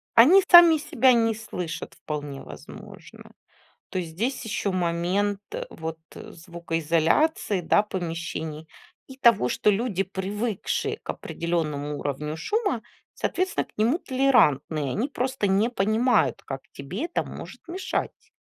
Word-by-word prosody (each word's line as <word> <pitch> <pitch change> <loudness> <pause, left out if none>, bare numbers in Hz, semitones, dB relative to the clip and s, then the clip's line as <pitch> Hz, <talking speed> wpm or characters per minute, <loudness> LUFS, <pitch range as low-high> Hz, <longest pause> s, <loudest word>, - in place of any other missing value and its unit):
Они 330 +12 +8
сами 345 -2 +9
себя 260 -3 +3
не 225 -2 +2
слышат, 180 -6 -6
вполне 145 -2 -6
возможно. 75 -1 -12 0.6
То 185 - -2
есть 165 -2 -5
здесь 240 +10 -2
еще 205 -2 -2
момент 185 +3 0 0.3
вот 160 0 -6 0.2
звукоизоляции, 170 - -1
да, 205 +4 +3
помещений, 165 -4 -5 0.4
и 265 0 -12
того, 230 - +4
что - - +2
люди, 205 -2 0
привыкшие 195 +3 -3
к - - -17
определенному 150 -4 -3
уровню 150 +2 -4
шума, 395 - -1 0.3
соответственно, 375 +2 -1
к - - -30
нему 230 +9 +2
толерантные. 155 - +2
Они 250 - -1
просто 255 -5 -1
не 200 +4 +2
понимают, 215 - +1
как 135 -1 -5
тебе 180 - -5
это 345 - -2
может - - -10
мешать. 370 +3 -4
195 Hz, 125 wpm, -25 LUFS, 160-245 Hz, 0.6 s, сами